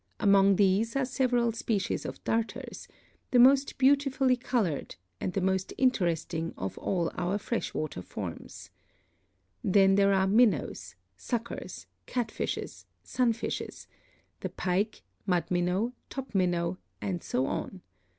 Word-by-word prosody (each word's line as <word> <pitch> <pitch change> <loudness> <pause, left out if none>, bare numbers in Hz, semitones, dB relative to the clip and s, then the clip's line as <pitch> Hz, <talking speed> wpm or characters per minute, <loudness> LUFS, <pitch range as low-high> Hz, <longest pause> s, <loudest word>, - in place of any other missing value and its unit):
Among 200 -1 +5
these 205 +4 +2
are 275 -1 +2
several 245 -2 +1
species 220 -3 -2
of - - -8
Darters, 225 0 -3 0.4
the 250 - +3
most 270 +3 +5
beautifully 270 -1 +3
colored 230 - -1 0.2
and 185 - -3
the 195 - 0
most 190 0 0
interesting 170 -9 0
of 95 - -4
all 175 -3 -1
our 180 +3 -1
fresh 230 +3 -3
water 155 -11 -3
forms. - - -8 0.9
Then 195 0 +5
there 200 0 +4
are 190 -1 +3
Minnows, 190 - +2 0.2
Suckers, 235 - -5 0.2
Catfishes, 240 -3 -3 0.2
Sunfishes, 235 -3 -2 0.5
the - - -4
Pike, 195 +4 -1 0.2
Mud 180 -2 +2
Minnow, 180 +7 +1 0.2
Top 270 -3 -6
Minnow, 175 -1 +1 0.2
and 180 -4 -3
so 130 - -1
on. 185 +6 -4
200 Hz, 120 wpm, -29 LUFS, 180-240 Hz, 0.9 s, Among